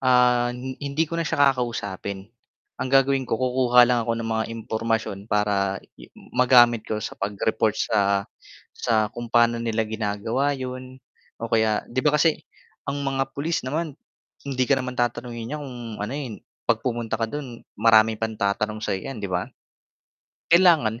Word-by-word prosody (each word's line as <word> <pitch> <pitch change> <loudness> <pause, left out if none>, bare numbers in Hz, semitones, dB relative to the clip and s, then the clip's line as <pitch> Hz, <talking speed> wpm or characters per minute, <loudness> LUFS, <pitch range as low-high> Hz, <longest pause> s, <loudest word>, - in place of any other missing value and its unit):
ah, 125 -1 +4 0.3
hindi 145 +3 0
ko 165 +1 -3
na 165 - 0
siya 140 -1 +4
kakausapin. 100 -6 -4 0.6
Ang - - -1
gagawin 135 -1 +3
ko - - +1
kukuha 125 0 +4
lang 120 0 +2
ako 115 0 -1
ng 115 0 -4
mga 110 0 0
impormasyon 115 -2 -2
para 100 -2 +1 0.2
i - - -12 0.2
magamit 120 -3 +5
ko 110 - -1
sa - - -4
pag-report 105 +2 0
sa 100 -2 +1 0.5
sa 110 -2 +1
kung 120 0 -6
paano 120 0 +4
nila 115 -1 0
ginagawa 110 +5 -1
yun, 130 0 -7 0.4
o 115 - -3
kaya 110 -1 +2
'di 130 - -1
ba 150 +2 +3
kasi, 155 +1 +2 0.5
ang 145 - -2
mga 135 0 -1
pulis 160 +4 -1
naman, 155 +3 -2 0.5
hindi 130 -2 0
ka 140 - +4
naman 125 -1 -5
tatanungin 120 -1 -2
niyan 150 - -3
kung 125 -3 -8 0.2
ano, 105 +4 -3
eh, 145 -3 -4 0.4
'pag 110 - +1
pumunta 120 -2 -2
ka 115 - 0
do'n 125 -3 -7 0.2
maraming 110 0 +5
pang 110 0 -3
tatanong 105 +2 -1
sa 105 - -1
'yo 95 - -7
'yan 130 -5 -6
'di 100 - -3
ba? 90 0 -2 1.0
Kailangan 160 -11 +5
120 Hz, 165 wpm, -24 LUFS, 110-130 Hz, 1.0 s, magamit